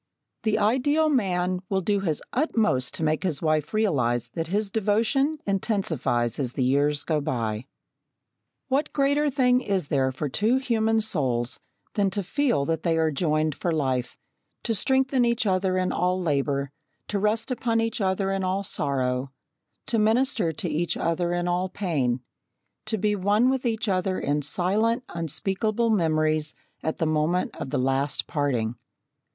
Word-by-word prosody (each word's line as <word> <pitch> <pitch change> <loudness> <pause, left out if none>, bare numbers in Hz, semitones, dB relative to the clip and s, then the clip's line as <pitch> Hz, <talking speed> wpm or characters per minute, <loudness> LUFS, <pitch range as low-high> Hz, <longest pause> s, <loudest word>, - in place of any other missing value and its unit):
The 215 -2 +1
ideal 265 +9 +2
man 185 -8 +1
will 190 -1 +1
do 200 +2 +1
his 165 -6 -2
utmost 220 - +1
to - - -3
make 155 +1 +1
his 175 -7 0
wife 155 +5 0
realise 125 - +1
that 165 +6 -4
his 200 +3 -1
devotion 225 +8 +1
intensifies 180 - 0
as 130 -3 -1
the 130 - 0
years 145 +3 +2
go 155 -2 0
by. 115 -4 -2 1.0
What 275 +3 0
greater 285 +1 +2
thing 255 -2 +3
is 190 - -1
there 130 -2 +2
for 145 +3 -3
two 215 - +2
human 225 -4 +1
souls 130 - -1 0.3
than 200 -3 +2
to 200 +1 -2
feel 240 - +1
that 165 +2 -1
they 165 -2 +1
are 160 -1 +2
joined 155 0 +1
for 175 - -2
life 130 -5 -1 0.5
to 230 - 0
strengthen 265 +3 +2
each 235 0 +1
other 185 -1 +1
in 185 0 0
all 180 +1 0
labour, 140 -4 0 0.4
to 205 - 0
rest 220 +4 0
upon 235 -2 0
each 225 -1 -1
other 195 0 0
in 195 0 -1
all 190 +2 0
sorrow, 135 -6 -1 0.6
to 230 - 0
minister 220 - +2
to 160 +3 -4
each 165 +1 -1
other 170 +1 0
in 175 0 -1
all 180 +1 0
pain, 140 -12 -1 0.7
to 220 - 0
be 210 +1 +1
one 205 +6 +3
with 265 -2 -1
each 225 -1 -1
other 185 -1 0
in 145 +1 0
silent 205 - +1
unspeakable 195 +8 -1
memories 155 -5 +1 0.3
at 160 - -2
the 165 - 0
moment 155 +3 0
of - - -5
the 145 - -1
last 135 +2 0
parting? 125 -7 -1
185 Hz, 160 wpm, -25 LUFS, 150-220 Hz, 1.0 s, thing